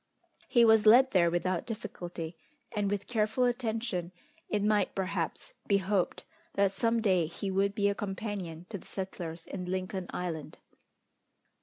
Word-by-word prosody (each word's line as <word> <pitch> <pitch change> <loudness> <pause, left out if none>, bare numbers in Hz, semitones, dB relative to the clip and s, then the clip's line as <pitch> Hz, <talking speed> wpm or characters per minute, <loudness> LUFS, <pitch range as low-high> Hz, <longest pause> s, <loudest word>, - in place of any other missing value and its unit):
He 240 -2 +5
was 220 -1 +6
led 260 +4 +8
there 175 -3 +4
without 175 +1 -1
difficulty; 175 -7 -5 0.4
and 205 -2 0
with 200 -1 -2
careful 220 +1 +1
attention, 225 -7 -1 0.4
it 205 -1 0
might, 210 0 +2
perhaps, 195 - -2
be 200 - +4
hoped 195 -1 0 0.3
that 200 -1 +3
some 230 +3 +1
day 185 -6 +3
he 190 +4 -4
would 200 +1 +1
be 200 -2 +2
a 200 - +2
companion 195 -5 -4
to 205 - -5
the - - -17
settlers 175 -4 -5
in 180 -2 -5
Lincoln 185 0 -3
Island. 165 -4 -4
200 Hz, 150 wpm, -31 LUFS, 180-215 Hz, 0.4 s, led